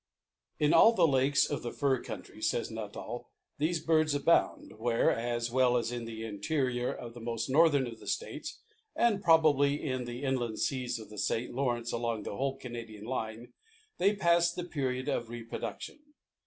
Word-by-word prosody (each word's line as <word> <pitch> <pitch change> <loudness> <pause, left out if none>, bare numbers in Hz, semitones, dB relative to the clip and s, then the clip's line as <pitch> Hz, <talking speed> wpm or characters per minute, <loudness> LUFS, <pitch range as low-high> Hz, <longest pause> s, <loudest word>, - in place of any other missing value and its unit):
In 150 +1 +3
all 220 +8 +7
the 180 -7 +4
lakes 140 0 +3
of 145 - -3
the 120 - -4
fur 135 -4 +1
countries, 105 +1 -4
says 120 - -2
Nuttall, 110 +2 -6 0.3
these 160 +3 +1
birds 155 -2 +2
abound, 145 -7 +1
where, 115 0 +2
as 120 0 -2
well 125 -1 +3
as 115 0 -1
in 120 -1 -4
the 115 -1 -6
interior 120 +4 -1
of 120 -1 -8
the 120 - -10
most 115 +2 -3
northern 145 -2 +5
of 115 -2 -8
the - - -13
states, 480 - -4 0.3
and 225 -4 +2
probably 150 -4 +4
in 130 -3 -2
the 120 +3 -6
inland 125 -5 -1
seas 130 -4 -1
of 110 -2 -11
the 105 - -7
St. 115 +4 -1
Lawrence, 120 -3 -1
along 115 -2 -2
the - - -5
whole 135 +2 -1
Canadian 115 -5 -8
line, 120 -1 -4 0.5
they 200 +3 +3
pass 170 -3 +3
the 175 - -5
period 130 -6 -2
of 120 -5 -1
reproduction. 120 - -6
125 Hz, 175 wpm, -31 LUFS, 115-145 Hz, 0.5 s, all